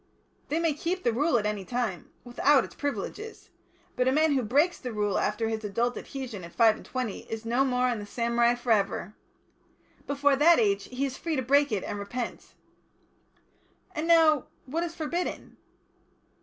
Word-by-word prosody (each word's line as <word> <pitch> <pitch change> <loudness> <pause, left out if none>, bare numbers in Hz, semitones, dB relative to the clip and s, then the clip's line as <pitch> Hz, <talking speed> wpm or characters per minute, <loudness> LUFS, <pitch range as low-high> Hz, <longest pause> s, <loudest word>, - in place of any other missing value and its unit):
"They 305 - 0
may 330 -2 +1
keep 350 +5 -3
the 235 - +2
Rule 280 +2 +2
at 210 - -1
any 210 -2 -2
time 235 -4 -3
without 265 +3 +3
its - - -13
privileges. 285 - -5 0.4
But 250 0 +1
a - - +4
man 310 +3 +3
who 265 - +2
breaks 290 +10 +2
the 250 - -5
Rule 210 -2 0
after 225 +2 0
his 220 0 -3
adult 235 +4 -1
adhesion 255 -9 -6
at 170 - -11
five 225 -2 +5
and - - -12
twenty 250 -5 -4
is 225 0 -5
no 240 +4 +2
more 250 -1 +1
in 240 -3 -1
the 205 - -8
samurai 235 +1 +2
for 240 0 -3
ever. 200 -2 +1 0.9
Before 285 0 +2
that 330 +5 +6
age 200 -3 +1
he 255 +2 -3
is 265 -1 -5
free 330 -2 -2
to 260 - -1
break 280 +2 +3
it 205 -3 -1
and 205 - -4
repent." 235 +4 -6 1.4
"And 310 +2 -3
now, 320 -4 +5 0.2
what 305 +6 -2
is 340 -1 -4
forbidden?" 340 +3 -4
250 Hz, 185 wpm, -28 LUFS, 220-290 Hz, 1.4 s, that